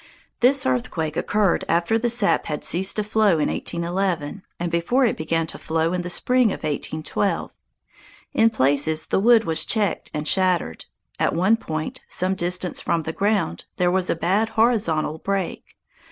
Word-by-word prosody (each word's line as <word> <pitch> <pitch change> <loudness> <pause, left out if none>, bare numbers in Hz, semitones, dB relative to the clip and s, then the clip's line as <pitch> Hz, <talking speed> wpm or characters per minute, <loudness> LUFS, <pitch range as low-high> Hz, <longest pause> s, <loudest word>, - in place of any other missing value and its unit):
This 265 +3 +3
earthquake 150 +5 -1
occurred 205 -1 +1
after 175 +7 +2
the 240 +1 0
sap 225 -3 +2
had 150 -2 -4
ceased 190 +3 +1
to 210 - 0
flow 210 -1 +2
in 150 - 0
1811, 175 -1 -3 0.2
and 175 0 -3
before 205 +11 +2
it 230 - +1
began 165 +1 -1
to 160 - -8
flow 165 +1 -1
in 180 - -1
the 180 - -5
spring 250 +7 +3
of - - -6
1812. 155 +6 -2 0.8
In 225 0 +4
places 155 -2 +1
the - - 0
wood 230 +2 +5
was 160 -6 +2
checked 210 -6 -1
and 150 0 -3
shattered. 180 - +1 0.3
At - - +1
one 190 +6 +3
point, 155 -8 -5
some 185 +1 0
distance 180 0 -1
from 165 -1 -1
the 160 - -4
ground, 200 - -1
there 180 0 +2
was 185 0 +1
a - - +1
bad 195 +7 0
horizontal 170 -10 +1
break. 195 -1 -4
180 Hz, 170 wpm, -22 LUFS, 160-210 Hz, 0.8 s, wood